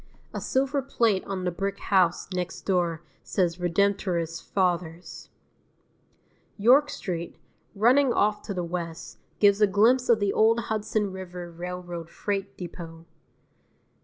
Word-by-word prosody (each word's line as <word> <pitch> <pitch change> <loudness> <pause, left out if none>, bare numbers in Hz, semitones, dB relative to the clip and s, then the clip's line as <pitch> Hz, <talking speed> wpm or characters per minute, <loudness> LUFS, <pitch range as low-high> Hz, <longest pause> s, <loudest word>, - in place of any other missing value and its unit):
A - - -4
silver 275 +2 0
plate 230 -7 +1
on 195 -2 -4
the 180 - 0
brick 195 +3 -3
house 185 -4 +2
next 180 -1 -3
door 170 -4 0 0.2
says 175 -3 0
Redemptorist 175 -2 0
Fathers. 175 -2 -2 1.3
York 260 +8 +5
Street, 170 -8 -5 0.4
running 250 +6 +4
off 210 -2 +1
to 200 - -2
the 180 - -2
west, 170 -1 -6 0.2
gives 205 0 +4
a 210 - +7
glimpse 230 +6 +3
of 230 -2 +5
the 200 -1 +1
old 225 +1 +4
Hudson 215 -1 -1
River 180 -2 -7
Railroad 175 -1 -6
freight 200 +1 -4
depot. 165 -2 -8
190 Hz, 130 wpm, -26 LUFS, 175-210 Hz, 1.3 s, a